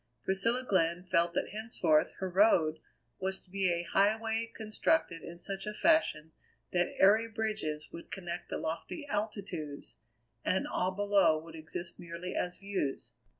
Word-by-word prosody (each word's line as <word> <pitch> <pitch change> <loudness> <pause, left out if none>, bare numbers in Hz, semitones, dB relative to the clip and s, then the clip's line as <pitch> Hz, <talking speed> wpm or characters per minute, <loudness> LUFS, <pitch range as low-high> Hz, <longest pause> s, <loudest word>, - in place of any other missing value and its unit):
Priscilla 230 +7 +1
Glenn 170 -2 +2
felt 170 -1 +2
that - - 0
henceforth 195 -7 +2
her 190 - -2
Road 175 -5 +4 0.4
was 190 0 -2
to 180 - -23
be 195 -1 +1
a 170 0 0
highway 220 +4 +1
constructed 215 - +1
in 170 - -8
such 195 +3 -4
a 210 - -3
fashion 295 - +3 0.4
that 175 -1 +1
airy 215 +4 +6
bridges 215 -9 -2
would 170 - -9
connect 175 -1 -5
the - - -2
lofty 165 - -4
altitudes, 200 - -4 0.5
and 190 - +1
all 180 - 0
below 200 -4 +3
would 160 +1 -9
exist 160 +2 -6
merely 170 +2 -6
as 180 0 -1
views. 195 -9 -3
190 Hz, 150 wpm, -32 LUFS, 170-210 Hz, 0.5 s, airy